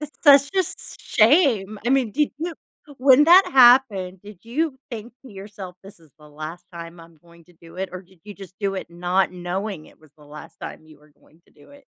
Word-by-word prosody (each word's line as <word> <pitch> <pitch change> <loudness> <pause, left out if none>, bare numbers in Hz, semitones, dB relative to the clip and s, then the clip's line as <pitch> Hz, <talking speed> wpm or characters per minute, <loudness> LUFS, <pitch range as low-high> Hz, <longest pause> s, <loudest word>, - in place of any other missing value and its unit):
It's 300 -1 -7
such 280 -2 +6
a - - +3
s 370 - -1
sh - - -12 0.2
shame. 215 - +3
I - - +1
mean, 260 -5 +1
did 300 0 0
you 335 +1 -4 0.4
when 270 +2 +5
that 360 +4 +7
happened, 240 -8 +4
did 205 -3 -14
you 275 +4 -2
think 235 +1 -9
to 260 - -14
yourself, 195 -2 -10
"This 195 -2 -15
is 160 -3 -22
the 150 0 -17
last 155 +4 -9
time 170 0 -10
I'm 165 -1 -17
going 170 +1 -21
to 180 - -23
do 165 +1 -17
it," 190 0 -4
or 185 +1 -8
did 180 -2 -25
you 205 -1 -10
just 190 -2 -13
do 195 -1 -1
it 185 - -7
not 180 +2 -1
knowing 180 -1 -5
it - - -21
was 155 -2 -21
the 150 - -18
last 150 +1 -13
time 155 - -9
you 155 -2 -18
were 150 0 -24
going 160 - -27
to - - -28
do - - -21
it? 285 0 -18
195 Hz, 235 wpm, -22 LUFS, 170-260 Hz, 0.4 s, that